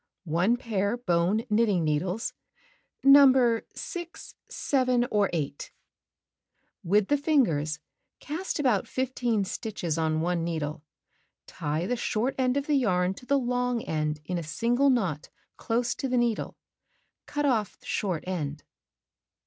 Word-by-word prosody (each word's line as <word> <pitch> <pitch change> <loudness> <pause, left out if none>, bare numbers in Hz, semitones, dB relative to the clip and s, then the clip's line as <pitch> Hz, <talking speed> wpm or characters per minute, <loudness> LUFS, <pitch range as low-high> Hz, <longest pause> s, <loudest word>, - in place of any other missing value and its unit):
One 180 +9 +2
pair 220 -2 -1
bone 185 -1 +1
knitting 210 -5 +2
needles, 180 +8 -1 0.7
No. 265 -4 +6
6, 345 -1 -7 0.2
7, 255 -3 +1
or 205 -2 +2
8. 145 -4 -4 1.1
With 200 +3 +2
the 290 - +4
fingers, 170 - +1 0.4
cast 330 +6 -4
about 250 -10 +1
15 245 -4 -1
stitches 180 -5 -3
on 160 0 +1
one 175 0 0
needle. 155 -3 -3 0.6
Tie 150 +3 -3
the 245 - 0
short 235 +2 -1
end 255 +1 +2
of 280 - -2
yarn 190 -11 +2
to 250 - -14
the 280 - +3
long 250 -2 0
end 150 -1 -2
in 180 +1 -2
a - - -4
single 240 - +1
knot 190 - 0 0.3
close 235 +2 -1
to 270 - -4
the 250 - +1
needle. 235 -2 0 0.7
Cut 290 0 -1
off 225 -7 0
short 185 -6 -2
end. 155 -5 -4
220 Hz, 130 wpm, -27 LUFS, 170-250 Hz, 1.1 s, No